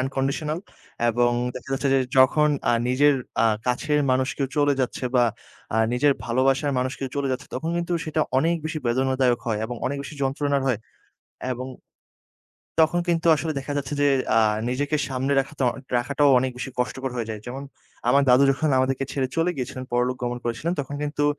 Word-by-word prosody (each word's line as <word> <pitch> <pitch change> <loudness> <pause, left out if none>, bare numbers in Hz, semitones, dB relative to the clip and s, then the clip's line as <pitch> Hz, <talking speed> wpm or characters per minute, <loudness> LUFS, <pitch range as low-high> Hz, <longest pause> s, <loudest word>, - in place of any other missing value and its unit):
unconditional 135 +4 -1 0.5
এবং 120 +1 +3 0.2
দেখা 125 - -9
যাচ্ছে 135 +1 0
যে 135 - +5 0.2
যখন 150 +4 +5 0.2
আ - - +4 0.2
নিজের 145 +3 +4 0.3
আ - - +4 0.2
কাছের 150 +4 +1
মানুষ 130 +1 +2
কেউ 135 -2 -1
চলে 145 -1 +4
যাচ্ছে 130 0 -2
বা, 125 - +5 0.5
আ - - +2 0.2
নিজের 140 +3 +3
ভালোবাসার 135 +4 +1
মানুষ 130 +1 -1
কেউ 135 - -3
চলে 140 -1 0
যাচ্ছে 135 +3 -5
তখন 165 +1 -2
কিন্তু 175 0 -2
সেটা 155 0 -1 0.2
অনেক 165 +4 +2
বেশি 155 0 -2
বেদনাদায়ক 130 0 +2
হয় 110 -2 0
এবং 120 +2 -4
অনেক 140 +2 -2
বেশি 140 +2 -8
যন্ত্রণার 140 +1 0
হয় 125 -5 +1 0.7
এবং 130 +1 -5 1.2
তখন 175 +2 0
কিন্তু 170 -1 +1
আসলে 155 +2 -2
দেখা 140 +2 -5
যাচ্ছে 140 0 -3
যে 145 - +5 0.3
আ - - +7 0.3
নিজেকে 145 +4 0
সামলে 135 +1 -1
রাখাতা 135 0 -3 0.3
রাখাটাও 140 +4 +2
অনেক 130 +1 0
বেশি 130 +2 -5
কষ্টকর 130 +1 -2
হয়ে 115 -2 -3
যায়। 110 -1 -5
যেমন 135 +3 -5 0.5
আমার 140 - +5
দাদু 125 +2 +6
যখন 150 +3 0
আমাদেরকে 135 +1 +1
ছেড়ে 130 -2 -1
চলে 165 +2 +2
গিয়েছিলেন, 130 0 -5
পরলোক 125 +1 +1
গমন 120 0 -2
করেছিলেন 120 +8 -2
তখন 140 +1 -6
কিন্তু 145 0 -1
135 Hz, 180 wpm, -24 LUFS, 125-145 Hz, 1.2 s, আ